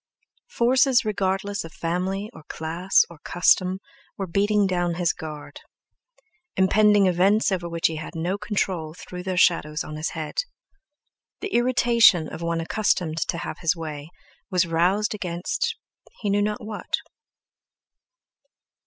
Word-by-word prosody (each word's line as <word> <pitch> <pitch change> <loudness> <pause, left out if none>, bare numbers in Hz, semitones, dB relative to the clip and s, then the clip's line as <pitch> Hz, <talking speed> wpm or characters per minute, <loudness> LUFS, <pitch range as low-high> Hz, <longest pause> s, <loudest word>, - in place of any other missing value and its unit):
Forces 255 - +3
regardless 200 -1 -1
of 165 - -10
family 185 +4 -2
or - - -12
class 170 +4 +1
or 170 -3 -14
custom 185 +1 +3 0.4
were 195 - -2
beating 205 +3 +2
down 175 -2 0
his 175 0 +1
guard; 150 -3 -8 1.0
impending 205 +1 +4
events 190 +4 +3
over 175 -2 -2
which 170 0 -3
he 160 - +2
had 155 +2 -7
no 170 +4 -1
control 180 -7 -2
threw 180 0 -8
their 185 0 -3
shadows 150 -4 +2
on 150 - -7
his 155 - -2
head. 155 -1 -3 1.0
The 405 - -5
irritation 235 -8 +4
of 160 - -8
one 170 0 -1
accustomed 165 -3 0
to 170 - -2
have - - -6
his 165 0 +1
way 155 -2 -7 0.4
was 180 -2 +2
roused 180 +6 +1
against 175 -4 -2 0.5
he 205 -3 0
knew 205 +1 +2
not 210 +2 -2
what. 210 -1 -3
180 Hz, 135 wpm, -24 LUFS, 165-205 Hz, 1.0 s, impending